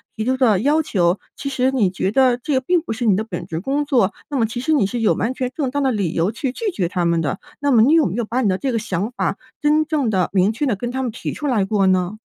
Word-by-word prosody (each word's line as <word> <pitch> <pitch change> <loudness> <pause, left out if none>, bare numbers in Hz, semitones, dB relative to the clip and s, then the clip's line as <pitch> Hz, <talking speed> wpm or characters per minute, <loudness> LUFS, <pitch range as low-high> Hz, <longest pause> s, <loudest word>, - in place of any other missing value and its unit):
提 220 - -3
出 260 +2 +1
的 225 -7 +3
要 295 +8 +2
求， 185 - +1 0.2
其 280 - -6
实 260 -1 +1
你 235 -8 +2
觉 190 +1 -2
得 255 -1 +3
这 285 +4 -3
个 260 - +2
并 350 +5 +1
不 330 - -7
是 240 +1 -3
你 205 - +4
的 215 - -1
本 200 -6 -6
职 165 -2 -4
工 275 - -1
作， 240 -9 +2 0.2
那 285 - -2
么 230 - +2
其 230 +2 -5
实 310 +5 0
你 255 -9 +3
是 240 +3 -4
有 220 - +3
完 235 +3 -1
全 255 -1 -3
正 285 -5 -1
当 285 +1 -1
的 265 - +2
理 200 -8 -1
由 170 +6 +1
去 250 +3 -3
拒 420 - -3
绝 185 - -1
他 175 0 -1
们 170 -1 +2
的。 160 +5 -2 0.2
那 285 0 +1
么 230 -4 +5
你 285 +7 +4
有 330 - +5
没 180 - -4
有 235 0 -1
把 240 +4 -1
你 210 - +2
的 185 - +1
这 270 +5 -2
个 230 - 0
想 210 +1 -3
法 - - -2 0.2
真 300 +1 +3
正 295 -5 0
地、 185 -4 +1
明 195 +1 +3
确 260 +7 -2
地 250 -6 +1
跟 240 +5 -4
他 265 +1 -2
们 245 - -2
提 230 - -5
出 295 - -4
来 225 -8 +1
过 195 -1 +1
呢？ 185 +3 +1
235 Hz, 330 characters per minute, -20 LUFS, 195-270 Hz, 0.2 s, 么